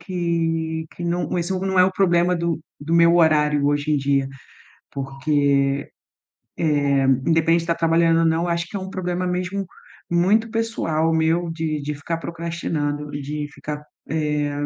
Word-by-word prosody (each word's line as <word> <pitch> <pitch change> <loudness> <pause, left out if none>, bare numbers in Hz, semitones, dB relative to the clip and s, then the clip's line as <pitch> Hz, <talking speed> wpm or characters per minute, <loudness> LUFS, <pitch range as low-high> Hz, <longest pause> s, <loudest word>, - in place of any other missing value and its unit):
que 165 -3 -1
que - - -8
não 175 +1 -1
esse 175 +2 -1
não 190 0 -1
é 180 - +8
o 190 - -1
problema 180 -2 +2
do 170 -1 -1 0.2
do 150 +3 -5
meu 170 0 +6
horário 150 -3 +3
hoje 145 +1 +1
em - - +3
dia, 140 -1 +1 0.6
porque, 140 +2 -1 1.6
eh, - - +2 0.2
independente 165 +1 +3
de 165 - -9
tá 170 - +3
trabalhando 165 0 +3
ou 165 - +3
não, 165 +1 +1
acho 170 0 -1
que - - -10
é - - -4
um 190 0 -6
problema 180 -1 -2
mesmo 180 +2 -2 0.4
muito 195 +7 +2
pessoal 190 -9 0
meu 165 +2 +1
de 160 -2 -2
de 150 +1 -3
ficar 165 +4 -4
procrastinando, 165 -3 -3
de 145 +1 -4
ficar, 150 0 -6 0.3
eh, 150 -2 0
165 Hz, 160 wpm, -22 LUFS, 150-175 Hz, 1.6 s, é